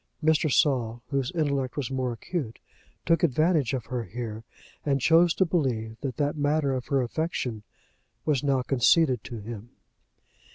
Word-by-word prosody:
Mr. 155 -1 +3
Saul, 120 -6 +1
whose 135 -2 0
intellect 140 -5 -1
was 135 -3 -2
more 130 -2 -1
acute, 120 0 -4 0.5
took 165 0 +3
advantage 155 -2 +2
of 120 -4 -4
her 125 -2 -3
here, 110 +1 -6 0.4
and 140 -2 +1
chose 165 +5 +5
to 190 - +3
believe 125 -10 -1
that 130 -4 -4
that 145 +1 0
matter 145 -1 +1
of 130 -1 -4
her 135 -2 +2
affection 125 -5 -3 0.6
was 145 -4 +1
now 135 -3 +2
conceded 130 -1 +3
to 120 - -7
him. 110 +1 -8
135 Hz, 155 wpm, -27 LUFS, 120-155 Hz, 0.6 s, chose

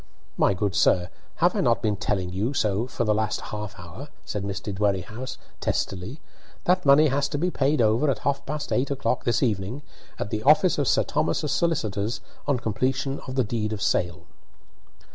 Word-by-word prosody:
"My 100 - +3
good 100 +1 -1
sir, 90 -3 +3 0.3
have - - +2
I - - +1
not 115 0 +2
been 105 -2 +1
telling 95 -2 -2
you 105 +9 -1
so 105 0 +1
for 125 - -2
the 110 -2 +2
last 110 0 0
half 105 -2 -6
hour?" 90 - -9 0.2
said 105 - -3
Mr. 100 +1 -4
Dwerrihouse, 105 +5 -2 0.2
testily. 95 - -2 0.4
"That 180 -3 +2
money 145 +2 +7
has 140 +1 0
to - - -2
be 180 +5 0
paid 140 -3 +2
over 115 +7 +3
at 135 - +1
half 140 0 0
past 150 +1 -3
eight 130 +2 +1
o'clock 125 -3 -1
this 120 +3 +2
evening, 110 +4 -1 0.3
at 105 - -4
the 110 - -1
office 155 - +5
of 140 - +1
Sir - - +4
Thomas's 150 0 0
solicitors, 110 - 0 0.3
on 140 -3 +2
completion 130 +5 -1
of 130 - -5
the 130 - +3
deed 110 -1 -2
of 105 - -5
sale." 85 -2 0
115 Hz, 185 wpm, -25 LUFS, 100-140 Hz, 0.4 s, money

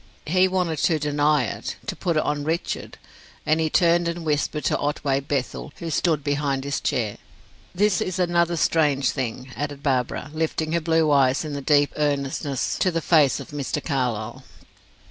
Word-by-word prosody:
He 185 +4 +3
wanted 180 -5 -1
to 160 +2 +2
deny 145 -1 +2
it 110 - -4
to - - -3
put 170 -3 -1
it - - +2
on 150 0 -1
Richard; 160 +3 -3 0.5
and 155 +1 +2
he 160 -1 +1
turned 170 +1 +3
and 170 0 -4
whispered 150 0 -1
to - - +2
Otway 145 -2 0
Bethel, 140 +1 -3
who 165 -2 -6
stood 155 -2 +1
behind 140 -2 -1
his 140 0 -2
chair. 110 -4 -1 0.6
This 200 -1 +2
is 185 0 -2
another 175 -1 +2
strange 150 -5 +2
thing," 130 0 -4
added 145 0 -5
Barbara, 135 +1 -1
lifting 160 0 -1
her 170 0 +1
blue 160 -1 +2
eyes 135 +1 +3
in 150 - -5
their 140 - -4
deep 145 0 +3
earnestness 140 -2 -1
to 185 - +3
the 165 -2 -1
face 155 -5 +3
of - - -9
Mr. 145 0 -2
Carlyle. 120 -6 -2
150 Hz, 175 wpm, -24 LUFS, 140-165 Hz, 0.6 s, He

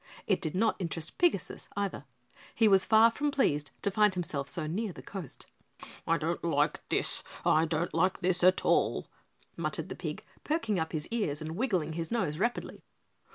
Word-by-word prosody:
It 195 -2 +1
did 160 -2 -3
not 220 +4 +2
interest 170 -2 -5
Pigasus, 330 - +1
either. 200 -8 -2 0.5
He 225 - +5
was 195 -2 +5
far 225 +1 +7
from 290 +5 -1
pleased 150 - +1
to 200 - +1
find 210 -1 +3
himself 145 -6 -2
so 160 +4 0
near 200 +7 -2
the - - -11
coast. 185 -9 -5 0.6
"I 165 - +3
don't 165 +2 -2
like 150 -2 +1
this, - - 0 0.2
I 160 +1 +4
don't 165 +2 -1
like 190 +1 +1
this 180 -1 +1
at 185 +1 +5
all," - - +2 0.5
muttered - - -3
the - - -5
pig, - - -5 0.2
perking 225 - 0
up 160 0 -2
his 150 -2 -3
ears 205 -11 -1
and 160 0 -5
wiggling 185 -8 0
his 165 0 -3
nose 170 -10 -1
rapidly. 240 +4 -2
180 Hz, 180 wpm, -30 LUFS, 160-215 Hz, 0.6 s, far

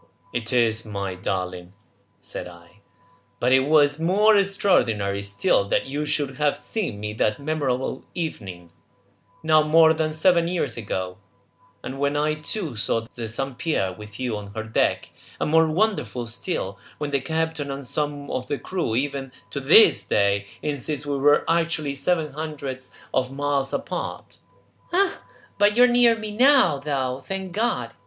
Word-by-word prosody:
"It 120 0 -3
is, 115 -3 +2
my 100 -3 -4
darling," 90 -1 -4 0.5
said - - -6
I. 85 -1 -16 0.6
"But 125 - +1
it 130 0 +5
was 145 -1 +4
more 205 +6 +4
extraordinary 120 - +2
still 100 0 +1
that - - +1
you 145 +3 -3
should 145 -3 -1
have 150 -1 +1
seen 190 - -3
me 105 0 -4
that 105 -1 0
memorable 140 -4 -2
evening, 95 - -5 0.7
now 155 -1 +5
more 160 +1 +5
than 160 -1 -1
seven 170 +1 +3
years 175 0 -1
ago, 95 -4 -4 0.6
and 135 - -6
when 140 +1 +1
I 150 +1 +1
too 155 - -4
saw 110 +2 0
the 115 -2 -5
Saint 130 +3 -4
Pierre 95 - 0
with 105 +2 -12
you 125 -4 -2
on 100 -1 -9
her 110 - -3
deck, 110 0 0 0.3
and - - -1
more 160 0 +5
wonderful 170 - 0
still, 110 - -4 0.2
when 150 -1 -4
the 140 -1 +1
captain 160 -1 -2
and 135 0 -5
some 145 +1 -3
of 130 - -3
the 145 - -2
crew 170 -12 -2
even 135 0 -2 0.2
to 140 - -3
this 140 - +6
day 100 0 +1 0.2
insist 145 0 -2
we 140 -1 -2
were 145 +2 +4
actually 165 -3 0
several 155 +2 0
hundreds 140 -4 -5 0.2
of 130 0 0
miles 140 -1 0
apart!" - - -5 0.5
"Ah, 385 +2 +1 0.4
but 205 +2 +4
you 245 - +8
are - - +8
near 240 -1 +4
me 215 -1 -6
now, 250 - +5
though, 135 -2 -2
thank 190 -1 -4
God!" 225 +6 -1
140 Hz, 160 wpm, -24 LUFS, 115-160 Hz, 0.7 s, you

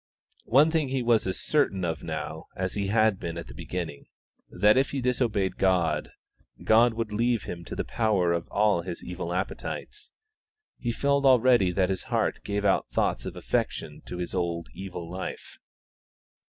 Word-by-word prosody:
One 145 +7 +5
thing 155 -4 +1
he 130 -1 -1
was 115 -4 +3
as 95 - -2
certain 100 -12 +1
of 80 -1 -2
now 80 0 -5
as 95 0 -2
he 100 -1 -1
had 110 -1 +3
been 85 -1 -5
at 85 - -5
the - - -11
beginning 85 -5 -5 0.4
that 105 +1 +4
if 135 +2 +3
he 140 - -2
disobeyed 120 -6 0
God, 85 -5 +2 0.5
God 115 +1 +5
would 115 -2 -3
leave 115 0 +1
him 85 -1 -6
to - - -6
the - - -2
power 100 -7 +1
of 85 0 -2
all 105 -4 +2
his 85 0 -6
evil 90 -1 -5
appetites; 100 - -4 0.7
he 120 -2 -1
felt 140 +3 +1
already 125 -7 +5
that 95 0 +2
his 95 - -3
heart - - 0
gave 100 0 -2
out 100 - +2
thoughts - - 0
of - - -6
affection - - -2
to 90 - -5
his 90 -1 -4
old 85 -2 -2
evil 90 -3 -7
life. 90 +2 -7
100 Hz, 175 wpm, -27 LUFS, 90-120 Hz, 0.7 s, One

